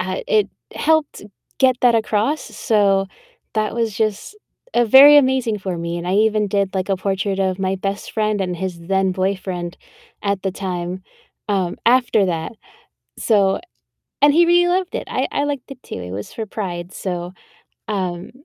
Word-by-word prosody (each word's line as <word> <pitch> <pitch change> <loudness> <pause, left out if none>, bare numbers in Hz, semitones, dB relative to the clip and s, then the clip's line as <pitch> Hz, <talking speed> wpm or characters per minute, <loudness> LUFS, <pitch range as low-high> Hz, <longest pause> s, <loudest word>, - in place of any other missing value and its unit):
uh, - - -3
it 440 -4 +2 0.3
helped 315 -2 +1 0.4
get 260 -2 +4
that 245 -2 +4
across, 225 +6 0
s - - -13
so 200 -4 +2 0.5
that 215 -1 0
was 230 -3 -1
just, 215 - -2 0.4
uh, 240 - +4
very 275 +6 +9
amazing 260 -6 +2
for 185 -3 -4
me, 170 +1 -3
and 170 - -6
I 185 - +1
even 215 0 +2
did, 200 -1 0
like, 190 0 -2
a 195 - +1
portrait 195 +1 -2
of 190 -1 0
my 190 0 0
best 195 +1 -4
friend 215 -2 0
and 180 -2 -2
his 180 -1 -5
then 190 +2 0
boyfriend 185 -2 -3 0.5
at 200 -2 -1
the 195 - -1
time, 180 -1 -4 0.5
um, 190 -3 0
after 235 -4 +4
that. 165 -3 -3 0.7
So 200 -4 +2 0.6
and 290 0 +6
he 345 - +6
really 350 +1 +4
loved 370 0 0
it, - - -3
I - - 0
I 285 - 0
liked 285 -2 -4
it 255 - -15
too, - - -8
it 90 0 -7
was 100 +2 -6
for 225 - -4
Pride, 180 -4 -5
so, 180 -1 -4 0.6
um, 185 -3 -3
200 Hz, 175 wpm, -20 LUFS, 185-235 Hz, 0.7 s, very